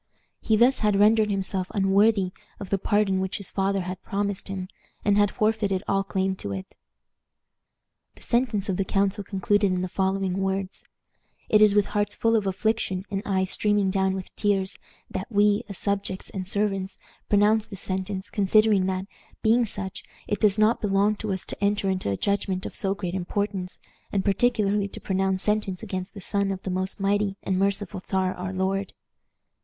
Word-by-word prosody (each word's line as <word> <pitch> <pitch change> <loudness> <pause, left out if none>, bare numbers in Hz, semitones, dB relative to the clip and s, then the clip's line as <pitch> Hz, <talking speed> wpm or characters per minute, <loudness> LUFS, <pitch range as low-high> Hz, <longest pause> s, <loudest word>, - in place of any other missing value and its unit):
He 220 - +2
thus 245 +4 +4
had 210 -2 +2
rendered 215 +1 +5
himself 190 -2 -1
unworthy 195 0 +3 0.3
of 195 - -8
the 195 - +2
pardon 205 -2 +2
which 190 0 -2
his 200 - -8
father 195 0 0
had 185 +1 -5
promised 200 -1 -2
him, 190 -1 -4 0.4
and 205 -1 +4
had 205 0 +4
forfeited 210 -3 0
all 195 0 +2
claim 190 -1 -1
to 100 - -5
it." 95 -1 -7 1.4
The - - -15
sentence 235 -4 0
of 190 -3 -1
the 195 - +1
council 200 +2 0
concluded 200 +1 +1
in 185 0 0
the - - -1
following 190 0 -1
words: 195 0 -2 0.7
"It 215 - +5
is 210 -1 +6
with 205 -1 +4
hearts 205 -1 0
full 230 0 +2
of 210 -3 +1
affliction 195 -1 -1
and 195 -1 -1
eyes 190 -2 0
streaming 205 -2 +2
down 190 0 +1
with 190 -1 -7
tears 195 -2 0 0.3
that 190 +5 -5
we, 205 0 +3
as 200 - -4
subjects 200 -2 -2
and 185 -2 -4
servants, 195 -1 -1 0.3
pronounce 210 +1 +3
this 195 -3 -6
sentence, 190 +1 -3
considering 205 -1 +3
that, 190 0 -2 0.4
being 235 +2 +4
such, 195 -3 -4 0.2
it 205 - -1
does 210 -1 +3
not 215 +2 +3
belong 205 +1 +2
to 215 -1 -3
us 190 -1 -3
to - - -6
enter 200 -1 +2
into 185 - -2
a 100 - -1
judgment 200 -2 -1
of - - -6
so 195 0 -1
great 180 -3 -4
importance, 190 0 -3 0.3
and 195 -2 0
particularly 205 -1 +2
to - - -9
pronounce 190 0 0
sentence 210 -3 0
against 185 +1 -5
the 200 - -8
son 200 +1 0
of 190 -1 -5
the 190 - -3
most 185 +2 -1
mighty 200 0 +1
and 185 -1 0
merciful 195 -1 -1
Czar 190 -1 0
our 185 +1 -5
lord. 190 +1 -1
195 Hz, 180 wpm, -25 LUFS, 190-205 Hz, 1.4 s, is